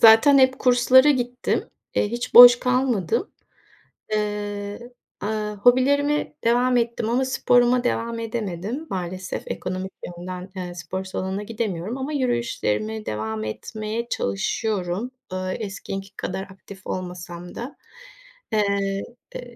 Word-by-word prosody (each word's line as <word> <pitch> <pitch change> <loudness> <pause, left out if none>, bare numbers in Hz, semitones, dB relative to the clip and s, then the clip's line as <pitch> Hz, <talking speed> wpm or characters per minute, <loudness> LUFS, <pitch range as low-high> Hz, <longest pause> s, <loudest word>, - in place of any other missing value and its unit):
zaten 230 +6 +8
hep 260 0 +4
kurslara 255 +2 +6
gittim. 250 -2 -1 0.2
Eee, - - +2
hiç 240 +1 -4
boş 245 0 +12
kalmadım. 250 - 0 0.8
Eee, 205 +2 -3 0.3
aaa, 210 0 -2
hobilerime 285 +7 +3
devam 245 +2 +3
ettim 235 -1 0
ama 250 +3 +2
sporuma 245 -1 +3
devam 230 -1 -1
edemedim. 225 - -4
Maalesef 185 0 -4
ekonomik 185 +1 -4
yönden, 180 +1 -7
eee, 180 -1 -5
spor 180 +2 -5
salonuna 190 +1 -3
gidemiyorum 215 0 -3
ama 270 +3 -4
yürüyüşlerime 230 - -1
devam 110 0 -3
etmeye 215 - -4
çalışıyorum. 190 - -2 0.2
Iıı, 185 0 -2
eskisi 195 -1 -6
kadar 190 - -3
aktif 195 0 -12
olmasam 180 -1 -6
da. 245 +5 -7 0.8
Eee, 200 -2 +1 0.3
ııı, - - -5
215 Hz, 115 wpm, -23 LUFS, 185-245 Hz, 0.8 s, boş